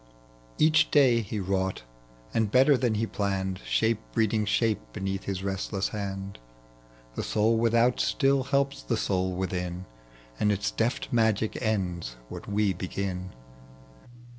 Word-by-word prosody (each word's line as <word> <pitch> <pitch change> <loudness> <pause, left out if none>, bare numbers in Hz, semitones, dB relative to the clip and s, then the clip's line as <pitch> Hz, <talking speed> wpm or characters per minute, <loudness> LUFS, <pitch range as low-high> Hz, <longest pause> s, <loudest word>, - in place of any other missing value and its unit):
Each 155 0 +4
day 130 -5 +5
he 105 0 -4
wrought 95 -4 -1 0.5
and 110 -2 +1
better 135 +5 +5
than 120 -3 +1
he 110 +2 0
planned, 95 -3 -2
Shape 105 - +2
breeding 110 -1 +1
shape 110 +1 +1
beneath 95 0 -3
hia 95 -1 -3
restless 95 0 -2
hand. 100 - -5 0.7
(The - - -3
soul 110 +2 +2
without 115 +2 +3
still 135 -3 +2
helps 140 0 0
the 115 - -1
soul 95 -3 0
within, 90 -1 -3 0.5
And 105 - +3
its 100 0 -1
deft 115 +2 -1
magic 110 -2 +1
ends 90 - -2
what - - -8
we 100 -1 +1
begin.) 95 0 -4
105 Hz, 135 wpm, -27 LUFS, 95-115 Hz, 0.7 s, day